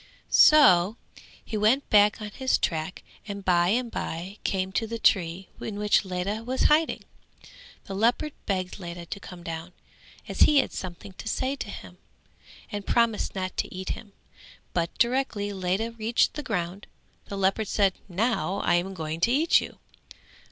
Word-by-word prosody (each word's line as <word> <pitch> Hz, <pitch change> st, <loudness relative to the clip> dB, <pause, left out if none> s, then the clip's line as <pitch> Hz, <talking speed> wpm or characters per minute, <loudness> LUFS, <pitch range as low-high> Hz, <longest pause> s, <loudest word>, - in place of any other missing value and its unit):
So 215 Hz, -, +6 dB, 0.5 s
he 225 Hz, -, -5 dB
went 225 Hz, +7 st, +3 dB
back 210 Hz, 0 st, +5 dB
on 210 Hz, -1 st, -5 dB
his 260 Hz, +4 st, +1 dB
track 160 Hz, +2 st, -2 dB, 0.2 s
and 200 Hz, -2 st, -6 dB
by 175 Hz, -1 st, +4 dB
and 235 Hz, +4 st, 0 dB
bye 185 Hz, +5 st, -5 dB
came 190 Hz, -1 st, -1 dB
to 225 Hz, +3 st, -1 dB
the 230 Hz, +1 st, -4 dB
tree 180 Hz, -4 st, +1 dB
in 205 Hz, -, -5 dB
which 210 Hz, 0 st, +3 dB
Ledha 190 Hz, +4 st, -3 dB
was 255 Hz, +2 st, -1 dB
hiding. 310 Hz, +2 st, +3 dB, 0.8 s
The 195 Hz, -, -7 dB
leopard 235 Hz, +8 st, +1 dB
begged 185 Hz, -1 st, -2 dB
Ledha 170 Hz, -1 st, -7 dB
to 200 Hz, -, -6 dB
come 180 Hz, -3 st, -11 dB
down, 165 Hz, +1 st, -6 dB, 0.5 s
as -, -, -6 dB
he 295 Hz, -, +6 dB
had 275 Hz, -, +2 dB
something 185 Hz, +2 st, -7 dB
to -, -, -7 dB
say 260 Hz, +4 st, -1 dB
to -, -, -6 dB
him, -, -, -10 dB, 0.7 s
and 205 Hz, -1 st, -4 dB
promised 230 Hz, -3 st, +1 dB
not 185 Hz, -1 st, -3 dB
to -, -, -2 dB
eat 185 Hz, 0 st, -6 dB
him; 205 Hz, -3 st, -6 dB, 0.6 s
but 170 Hz, -1 st, 0 dB
directly 235 Hz, -5 st, 0 dB
Ledha 190 Hz, +4 st, -1 dB
reached 230 Hz, +1 st, +1 dB
the 300 Hz, -, -4 dB
ground 195 Hz, -6 st, -3 dB, 0.4 s
the 200 Hz, -, -6 dB
leopard 195 Hz, +2 st, +1 dB
said 200 Hz, -1 st, +2 dB, 0.2 s
"Now 200 Hz, 0 st, 0 dB
I -, -, +2 dB
am 190 Hz, +2 st, -7 dB
going 160 Hz, -1 st, -4 dB
to 235 Hz, +8 st, +2 dB
eat 310 Hz, +6 st, +4 dB
you." -, -, -8 dB
200 Hz, 165 wpm, -26 LUFS, 180-230 Hz, 0.8 s, So